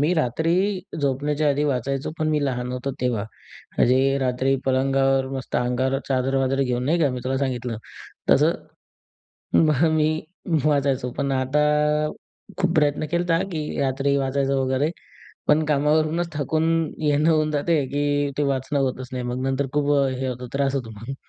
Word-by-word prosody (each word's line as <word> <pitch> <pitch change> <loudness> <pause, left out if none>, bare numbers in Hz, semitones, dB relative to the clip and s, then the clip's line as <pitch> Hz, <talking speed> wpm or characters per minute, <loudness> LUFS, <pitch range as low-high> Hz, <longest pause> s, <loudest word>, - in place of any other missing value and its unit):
मी 150 +5 +2
रात्री 160 +3 0 0.5
झोपण्याच्या 145 +2 0
आधी 145 +1 +1
वाचायचो. 135 0 -1
पण 155 0 0
मी 150 -2 +1
लहान 125 -2 -2
होतो 125 +2 -3
तेव्हा. 120 -5 0 0.5
म्हणजे 135 +2 +3
रात्री 130 +1 +1
पलंगावर 135 0 +2
मस्त 135 -2 -4
अंगावर 130 +2 0
चादर-वादर 135 +1 +1
घेऊन 125 -1 -1
नाही 165 +5 +2
का 145 -4 +3
मी 125 -1 -4
तुला 135 +1 0
सांगितलं 125 -4 -2 0.5
तसं. - - +5 1.0
मग 155 -1 +4
मी 155 -1 +3 0.6
वाचायचो. 140 -4 +1
पण 140 -1 0
आता 135 +3 +1 1.0
खूप 180 -2 +1
प्रयत्न 150 0 +2
केलता, 170 -1 +1
की 150 -2 -3
रात्री 140 +1 +1
वाचायचं 135 0 0
वगैरे. 130 +4 +1 0.6
पण 155 +1 +4
कामावरूनच 155 +3 +1
थकून 155 +2 0 0.4
येणं 150 +2 +3
होऊन 155 -1 +2
जाते, 150 0 +1
की 145 +1 0
ते 150 - +2
वाचणं 140 0 0
होतच 130 -1 -2
नाही 125 -1 -3
मग. 125 +1 -3
नंतर 135 +1 0
खूप 145 0 +1 0.3
हे 135 - -2
होतो 125 0 -5
त्रास 140 0 0
होतो 120 -5 -3
मग. 130 +5 -6
135 Hz, 150 wpm, -23 LUFS, 130-150 Hz, 1.0 s, तसं